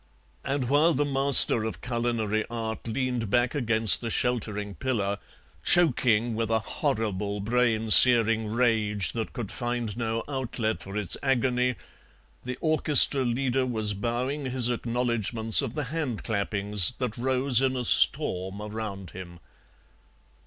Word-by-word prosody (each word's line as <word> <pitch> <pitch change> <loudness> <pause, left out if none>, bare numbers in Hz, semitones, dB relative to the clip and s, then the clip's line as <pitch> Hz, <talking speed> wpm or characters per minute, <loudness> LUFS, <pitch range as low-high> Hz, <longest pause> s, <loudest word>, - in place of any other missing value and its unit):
And 135 -2 -3
while 150 +5 +2
the 145 +3 -1
master 135 -4 +7
of 110 -6 -7
culinary 115 -3 -3
art 115 -1 -6
leaned 125 -2 -4
back 120 +2 0
against 110 - +3
the 115 - -5
sheltering 105 -4 -2
pillar, 105 -5 -4 0.4
choking 120 - +2
with 115 0 -3
a 115 - +1
horrible 105 -2 -4
brain 115 0 -1
searing 115 -2 +5
rage 110 -5 -1
that 115 -2 -6
could 115 -5 -7
find 120 -3 -5
no 115 -1 -4
outlet 120 - -4
for 95 +3 -9
its 105 -5 -3
agony, 125 -1 -1 0.7
the 125 0 -7
orchestra 150 -3 +4
leader 130 +1 -2
was 110 -4 -2
bowing 125 +7 -4
his 125 -2 0
acknowledgments 115 -2 0
of 115 - -6
the 150 - -3
hand 145 -9 -5
clappings 100 -1 +1
that 125 -3 -5
rose 130 0 +1
in 130 -1 -1
a 125 - -4
storm 95 -3 0
around 105 -4 -8
him. 85 -2 -12
115 Hz, 135 wpm, -25 LUFS, 105-125 Hz, 0.7 s, master